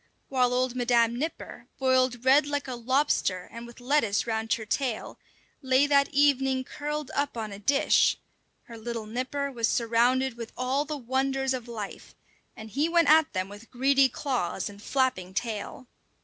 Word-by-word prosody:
While 255 Hz, -2 st, +2 dB
old 250 Hz, 0 st, 0 dB
Madam 235 Hz, -2 st, +2 dB
Nipper, 310 Hz, +7 st, -5 dB
boiled 255 Hz, -2 st, +1 dB
red 275 Hz, +2 st, +5 dB
like 290 Hz, -1 st, -2 dB
a 260 Hz, -, -4 dB
lobster 240 Hz, -7 st, 0 dB
and 230 Hz, +1 st, -9 dB
with 235 Hz, +1 st, -14 dB
lettuce 245 Hz, -6 st, +1 dB
round 220 Hz, -1 st, -3 dB
her 220 Hz, -, -3 dB
tail, 245 Hz, 0 st, -3 dB, 0.4 s
lay 265 Hz, +1 st, +3 dB
that 280 Hz, -1 st, +3 dB
evening 270 Hz, -2 st, +2 dB
curled 295 Hz, +1 st, -5 dB
up 285 Hz, -3 st, -1 dB
on 215 Hz, -2 st, -4 dB
a 200 Hz, -, -8 dB
dish, 275 Hz, +7 st, +3 dB, 0.5 s
her 230 Hz, -1 st, -11 dB
little 230 Hz, -1 st, -5 dB
nipper 260 Hz, +5 st, -3 dB
was 230 Hz, -3 st, 0 dB
surrounded 240 Hz, +2 st, +1 dB
with 230 Hz, -1 st, -8 dB
all 260 Hz, +3 st, 0 dB
the 300 Hz, 0 st, -4 dB
wonders 265 Hz, +1 st, -1 dB
of 250 Hz, -2 st, -5 dB
life; 215 Hz, -4 st, -8 dB, 0.4 s
and 220 Hz, 0 st, -10 dB
he 295 Hz, +7 st, 0 dB
went 335 Hz, -2 st, +3 dB
at 315 Hz, -1 st, +5 dB
them 185 Hz, -1 st, -2 dB
with 205 Hz, +3 st, -12 dB
greedy 270 Hz, +1 st, +3 dB
claws 240 Hz, -, -2 dB
and 205 Hz, 0 st, -13 dB
flapping 215 Hz, -9 st, -1 dB
tail. 220 Hz, +4 st, -4 dB
255 Hz, 165 wpm, -27 LUFS, 230-275 Hz, 0.5 s, red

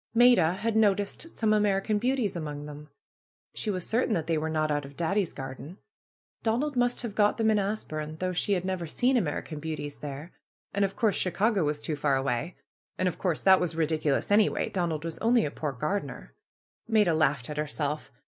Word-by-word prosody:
Maida 235 Hz, -9 st, +6 dB
had 220 Hz, +4 st, -2 dB
noticed 205 Hz, +8 st, +1 dB
some 220 Hz, -2 st, +2 dB
American 210 Hz, 0 st, +2 dB
Beauties 245 Hz, -4 st, 0 dB
among 150 Hz, -3 st, -5 dB
them. 150 Hz, 0 st, -10 dB, 0.6 s
She 215 Hz, -, -3 dB
was 185 Hz, -4 st, -2 dB
certain 230 Hz, 0 st, +1 dB
that 165 Hz, -3 st, -1 dB
they 165 Hz, -, 0 dB
were 155 Hz, +1 st, -1 dB
not 155 Hz, -1 st, 0 dB
out 145 Hz, 0 st, 0 dB
of 140 Hz, 0 st, -12 dB
Daddy's 190 Hz, +2 st, 0 dB
garden. 135 Hz, +5 st, -8 dB, 0.6 s
Donald 255 Hz, +6 st, 0 dB
must 245 Hz, +1 st, +1 dB
have 230 Hz, -4 st, -4 dB
got 210 Hz, 0 st, +3 dB
them 220 Hz, -1 st, +3 dB
in 210 Hz, -, +3 dB
As 205 Hz, +2 st, -1 dB
burne, 155 Hz, -1 st, -5 dB
although 185 Hz, 0 st, -1 dB
she 200 Hz, +3 st, 0 dB
had 185 Hz, -1 st, -1 dB
never 185 Hz, -3 st, -2 dB
seen 250 Hz, +11 st, +2 dB
American 155 Hz, -6 st, -2 dB
Beau 160 Hz, +1 st, -3 dB
ties 145 Hz, -1 st, -7 dB
there. 145 Hz, +4 st, -7 dB, 0.4 s
And 200 Hz, -, +1 dB
of 195 Hz, 0 st, -1 dB
course 220 Hz, -5 st, +2 dB
Chicago 195 Hz, +1 st, +1 dB
was 150 Hz, 0 st, -1 dB
too 155 Hz, -, -1 dB
far 145 Hz, -1 st, +1 dB
away. 135 Hz, +5 st, -1 dB, 0.4 s
And 185 Hz, -, +1 dB
of 180 Hz, -, -3 dB
course 175 Hz, -5 st, 0 dB
that 190 Hz, -1 st, +6 dB
was 170 Hz, -2 st, -2 dB
ridiculous 155 Hz, 0 st, 0 dB
anyway. 210 Hz, +1 st, +3 dB
Donald 165 Hz, -4 st, -2 dB
was 165 Hz, -1 st, -5 dB
only 235 Hz, 0 st, +3 dB
a 145 Hz, -, -3 dB
poor 150 Hz, -1 st, -3 dB
gardener. 135 Hz, -, -4 dB, 0.5 s
Maida 210 Hz, -6 st, +3 dB
laughed 145 Hz, -5 st, +1 dB
at 150 Hz, -, -6 dB
herself. 150 Hz, 0 st, -2 dB
175 Hz, 200 wpm, -28 LUFS, 150-210 Hz, 0.6 s, Maida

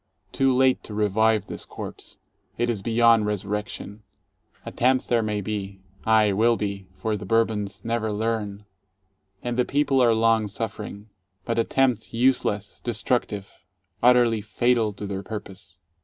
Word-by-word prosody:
Too 135 Hz, 0 st, +2 dB
late 130 Hz, 0 st, +3 dB
to 105 Hz, -, -8 dB
revive 110 Hz, +1 st, +2 dB
this -, -, -6 dB
corpse. -, -, -8 dB, 0.4 s
It 120 Hz, 0 st, +1 dB
is 105 Hz, -4 st, -4 dB
beyond 115 Hz, 0 st, +4 dB
resurrection. 105 Hz, +1 st, -4 dB, 0.6 s
Attempts 130 Hz, +1 st, +1 dB
there 120 Hz, -1 st, +2 dB
may 105 Hz, -1 st, -2 dB
be, 100 Hz, -1 st, -5 dB, 0.3 s
aye, 110 Hz, -2 st, +4 dB
will 115 Hz, +3 st, +3 dB
be, 100 Hz, -2 st, -4 dB
for 110 Hz, -2 st, -2 dB
the 105 Hz, -, -6 dB
Bourbons 110 Hz, -3 st, 0 dB
never 115 Hz, -1 st, -1 dB
learn, 105 Hz, -1 st, -2 dB, 0.3 s
— 95 Hz, 0 st, -42 dB
and 120 Hz, 0 st, -2 dB
the 125 Hz, -, +4 dB
people 140 Hz, 0 st, +2 dB
are 120 Hz, -2 st, +5 dB
long 110 Hz, -1 st, +3 dB
suffering. 105 Hz, 0 st, -6 dB, 0.3 s
But 115 Hz, 0 st, 0 dB
attempts 125 Hz, 0 st, +1 dB
useless, 115 Hz, -4 st, 0 dB
destructive, 100 Hz, -3 st, -2 dB, 0.4 s
utterly 120 Hz, -2 st, +4 dB
fatal 120 Hz, 0 st, +1 dB
to 100 Hz, +1 st, -7 dB
their 100 Hz, -1 st, -4 dB
purpose. 100 Hz, -3 st, -9 dB
110 Hz, 140 wpm, -24 LUFS, 100-115 Hz, 0.6 s, are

